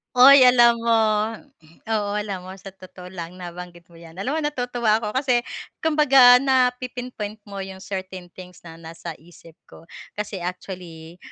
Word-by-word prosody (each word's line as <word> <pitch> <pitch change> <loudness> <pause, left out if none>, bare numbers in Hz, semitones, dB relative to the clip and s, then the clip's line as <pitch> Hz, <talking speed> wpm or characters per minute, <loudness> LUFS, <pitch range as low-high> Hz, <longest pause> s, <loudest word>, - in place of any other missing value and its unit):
Hoy! 260 +1 +8
alam 240 -1 +5
mo, 230 0 0 1.0
oo 210 -2 -1
alam 200 -3 -4
mo 185 - -9
sa 195 0 -11
totoo 185 -1 -13
lang 175 -1 -8
nabanggit 175 -1 -10
mo 170 - -17
'yan 165 -1 -14
alam 250 - -3
mo - - 0
natutuwa 245 -6 -1
ako 210 - -3
kasi 255 0 +1 0.4
kumbaga 275 -6 +6
napi-inpoint 250 -4 -2
mo 200 - -8
'yong 190 -1 -8
certain 190 -2 -7
things 180 0 -14
na 165 -1 -12
nasa 165 0 -9
isip 165 0 -18
ko 165 - -17 0.2
kasi 205 -1 -5
actually, 175 -2 -8
195 Hz, 155 wpm, -22 LUFS, 180-245 Hz, 1.0 s, Hoy